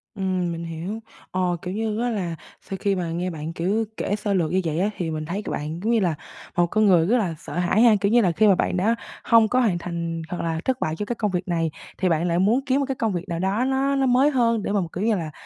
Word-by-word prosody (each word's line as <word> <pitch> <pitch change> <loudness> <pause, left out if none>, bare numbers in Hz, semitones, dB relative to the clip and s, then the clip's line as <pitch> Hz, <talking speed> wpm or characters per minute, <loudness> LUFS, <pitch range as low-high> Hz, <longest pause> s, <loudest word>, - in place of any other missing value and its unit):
Ừm, 185 -3 -1
mình 165 0 -5
hiểu. 170 +7 -5 0.3
Ờ, 180 -1 0
kiểu 180 0 -4
như 220 0 -2
á, 245 - +1
là 180 -7 -2 0.3
sau 195 - -6
khi 200 -1 +1
mà 170 -3 -2
nghe 175 +2 -2
bạn, 160 0 -5
kiểu, 200 +7 0
kể 205 - -1
sơ 205 -1 -2
lược 170 -4 +1
như 190 +1 +2
vậy 160 +1 -1
á, 200 +3 +2
thì 170 -3 -2
mình 155 0 -3
thấy 195 +6 -3
c - - -12
bạn 155 +3 -4
giống 225 +3 0
như 230 - +4
là 175 -5 +1 0.4
một 175 - +5
con 215 +4 +2
người 175 -4 +5
rất 245 +3 +3
là 180 -8 -1
sợ - - -9
hãi 180 +5 +2
ha. 230 -3 +7
Kiểu 200 +1 +2
như 240 0 +5
là, 180 -4 +3
khi 215 +5 +3
mà 195 - +6
bạn 180 - 0
đã 220 +6 +2 0.3
hông 230 -1 +5
có 255 - +2
hoàn 210 -8 +2
thành 170 -1 -4
hoặc 175 - -3
là 165 -1 -1
thất 260 -1 0
bại 155 0 -1
cho 210 - -4
cái 240 - -3
công 210 -3 -1
việc 180 +1 -2
này, 165 -2 0 0.3
thì 185 -2 +1
bạn 165 +2 +1
lại 170 +1 +1
muốn 215 +7 +3
kiếm 270 +1 +2
một 280 - +1
cái 270 -1 -3
công 225 -5 -1
việc 175 0 -4
nào 170 0 -2
đó 200 +7 +1
nó 270 +1 +1
nó 270 -1 +2
mới 260 +3 +4
hơn 230 -4 +2
để - - -2
mà 205 -2 +2
mà, 170 - -3
kiểu 185 - -3
như 225 -1 +3
là, 160 -4 -4
190 Hz, 300 wpm, -24 LUFS, 170-220 Hz, 0.4 s, ha